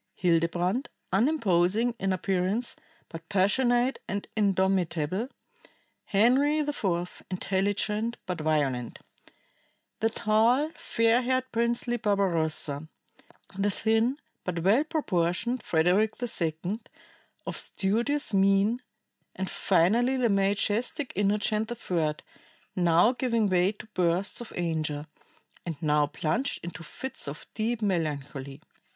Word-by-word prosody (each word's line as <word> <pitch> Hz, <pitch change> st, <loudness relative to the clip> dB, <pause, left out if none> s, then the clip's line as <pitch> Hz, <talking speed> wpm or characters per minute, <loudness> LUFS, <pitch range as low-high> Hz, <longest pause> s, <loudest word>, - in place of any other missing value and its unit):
Hildebrand, 175 Hz, -, +1 dB, 0.2 s
unimposing 220 Hz, -, +2 dB
in 195 Hz, 0 st, 0 dB
appearance, 190 Hz, +5 st, -1 dB, 0.3 s
but 165 Hz, -1 st, -10 dB
passionate 240 Hz, +6 st, +2 dB
and 200 Hz, +1 st, -3 dB
indomitable; 190 Hz, -1 st, +1 dB, 0.8 s
Henry 255 Hz, +9 st, +3 dB
IV, 195 Hz, -, -2 dB
intelligent, 205 Hz, +4 st, -1 dB
but 180 Hz, -3 st, -4 dB
violent; 140 Hz, -6 st, 0 dB, 1.0 s
the 225 Hz, -, +2 dB
tall, 230 Hz, +8 st, +2 dB
fair 230 Hz, +1 st, +2 dB
haired, 255 Hz, +1 st, -1 dB
princely 235 Hz, +1 st, 0 dB
Barbarossa; 165 Hz, -8 st, 0 dB, 0.7 s
the 200 Hz, +1 st, +1 dB
thin, 225 Hz, +6 st, +1 dB, 0.3 s
but 170 Hz, -2 st, -3 dB
well 215 Hz, +10 st, +4 dB
proportioned, 240 Hz, -, -1 dB
Frederick 185 Hz, +7 st, +2 dB
II, 180 Hz, -3 st, -2 dB, 0.7 s
of -, -, -3 dB
studious 235 Hz, +8 st, +1 dB
mien; 195 Hz, +4 st, +3 dB, 0.5 s
and 190 Hz, 0 st, -3 dB
finally 220 Hz, +9 st, +3 dB
the 245 Hz, -2 st, +2 dB
majestic 205 Hz, +7 st, 0 dB
Innocent 210 Hz, +2 st, +1 dB
III, 165 Hz, -9 st, -1 dB, 0.6 s
now 175 Hz, +4 st, +4 dB
giving 230 Hz, -4 st, 0 dB
way 185 Hz, +2 st, +2 dB
to 205 Hz, -, -11 dB
bursts 180 Hz, +5 st, 0 dB
of 235 Hz, -, -2 dB
anger, 155 Hz, -4 st, -2 dB, 0.6 s
and 165 Hz, -4 st, -5 dB
now 150 Hz, -2 st, +2 dB
plunged 225 Hz, -, -1 dB
into 175 Hz, +1 st, -7 dB
fits 260 Hz, -, -1 dB
of 140 Hz, +2 st, -7 dB
deep 225 Hz, +1 st, -2 dB
melancholy. 145 Hz, -7 st, -3 dB
195 Hz, 105 wpm, -28 LUFS, 175-235 Hz, 1.0 s, well